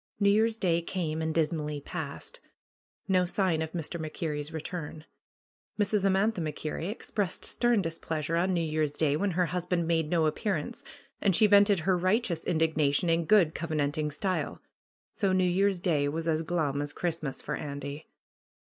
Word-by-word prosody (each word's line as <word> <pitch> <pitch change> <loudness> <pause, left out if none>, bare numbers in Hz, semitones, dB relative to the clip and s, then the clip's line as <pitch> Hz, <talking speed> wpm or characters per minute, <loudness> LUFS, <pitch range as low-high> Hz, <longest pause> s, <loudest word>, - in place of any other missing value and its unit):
New 200 -1 +4
Year's 220 +2 +2
Day 170 -5 +1
came 165 -2 -3
and 160 0 -1
dismally 150 -2 -1
passed. - - -7 0.7
No 185 -2 +3
sign 180 -4 +1
of 160 0 -4
Mr. 170 0 -4
MacKerrie's 155 -1 -4
return. 160 -1 -6 0.7
Mrs. 205 -1 +1
Amantha 195 +1 +2
MacKerrie 155 +2 -3
expressed 205 -3 -2
stern 240 -4 +2
displeasure 165 -1 -3
on 180 +3 +2
New 170 -2 +1
Year's 155 -2 0
Day 145 -1 +2
when 200 +6 0
her 180 - +4
husband 175 +1 -1
made 165 -2 +1
no 165 -2 +2
appear 195 +6 0
ance, - - -6 0.4
and 195 -4 +3
she 215 - +5
vented 200 -2 +5
her 185 +3 +2
righteous 185 -1 0
indignation 160 -1 +2
in 165 0 +1
good 180 -5 +5
covenanting 155 -1 -1
style. 185 +5 -2 0.5
So 195 -3 +1
New 185 0 +3
Year's 190 +1 +2
Day 155 -6 +1
was 160 +2 -3
as 160 -1 +1
glum 155 -4 -1
as 145 0 -4
Christmas 160 -5 -3
for 150 - -4
Andy. 140 0 -6
165 Hz, 165 wpm, -29 LUFS, 155-190 Hz, 0.7 s, she